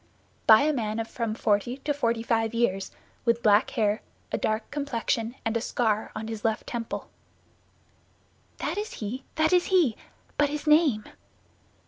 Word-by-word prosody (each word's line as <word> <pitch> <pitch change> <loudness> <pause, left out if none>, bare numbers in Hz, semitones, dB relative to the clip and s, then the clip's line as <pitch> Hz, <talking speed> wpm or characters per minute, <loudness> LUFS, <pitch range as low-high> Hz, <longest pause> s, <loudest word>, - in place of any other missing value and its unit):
"By 220 0 +9
a 305 +1 +2
man 220 -5 -2
of 225 - -2
from 230 -3 -3
forty 220 +3 +1
to 290 +1 -1
forty 235 -5 0
five 225 -1 0
years, 195 -5 +1 0.3
with 235 -1 +1
black 210 -1 +5
hair, 215 -3 0 0.3
a - - 0
dark 215 0 -1
complexion, 245 -4 -1
and 225 0 0
a 230 - +1
scar 220 -3 0
on 220 0 -4
his 225 -1 -6
left 220 -1 0
temple." 235 -2 -4 1.5
"That - - -2
is 430 +2 -5
he, 230 +5 -5
that 315 +3 +3
is 360 -1 +4
he; 340 - +3 0.4
but 290 -1 +4
his 300 +1 -4
name?" 300 -8 +4
230 Hz, 160 wpm, -27 LUFS, 220-280 Hz, 1.5 s, By